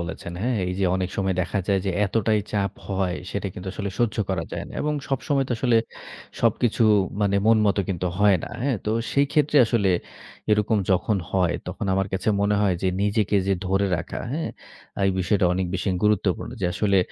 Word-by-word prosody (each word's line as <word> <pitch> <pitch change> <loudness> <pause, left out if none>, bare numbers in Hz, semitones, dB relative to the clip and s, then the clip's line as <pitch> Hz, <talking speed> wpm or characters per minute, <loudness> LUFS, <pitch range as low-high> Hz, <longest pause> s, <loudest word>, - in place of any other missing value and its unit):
বলেছেন, 85 0 -6
হ্যাঁ? 120 +2 0
এই 90 - -2
যে 95 - +1
অনেক 95 -1 -1
সময় 95 -1 0
দেখা 90 +3 -1
যায় 100 -2 +2
যে - - +2
এতটাই 110 +1 +1
চাপ 100 -3 0 0.2
হয়, 95 -2 0 0.2
সেটা 100 0 -3
কিন্তু 95 +1 -7
আসলে 100 -1 -3
সহ্য 120 -3 +1
করা - - -1
যায় - - -4
না। - - -12
এবং 150 0 0 0.2
সবসময় 135 +1 0
তো - - 0
আসলে 120 -1 +3 0.6
সবকিছু 115 +1 +2 0.4
মানে 100 -1 +2
মন 115 0 +6
মত 100 - +2
কিন্তু 90 -1 -2
হয় 105 -2 +5
না, - - -8
হ্যাঁ? 135 -4 +1
তো 105 - -1 0.2
সেই 140 0 +3
ক্ষেত্রে 150 -1 +2
আসলে 105 -4 +2 0.6
এরকম 105 +1 +3
যখন 95 +3 +2
হয়, 90 -3 +1
তখন 100 +4 -4
আমার 95 0 +1
কাছে 95 +2 -1
মনে 100 +1 +2
হয় 100 -3 +2
যে, 95 - +2
নিজেকে 105 0 +1
যে 100 - +2
ধরে 95 +1 +2
রাখা, - - -5
হ্যাঁ? 160 +2 -2 0.6
এই 95 - +4
বিষয়টা 95 +1 +1
অনেক 90 0 -1
বেশি 95 +1 -2 0.2
গুরুত্বপূর্ণ। 105 0 +1
যে - - +1
আসলে 100 +2 +2
100 Hz, 195 wpm, -24 LUFS, 95-110 Hz, 0.6 s, মন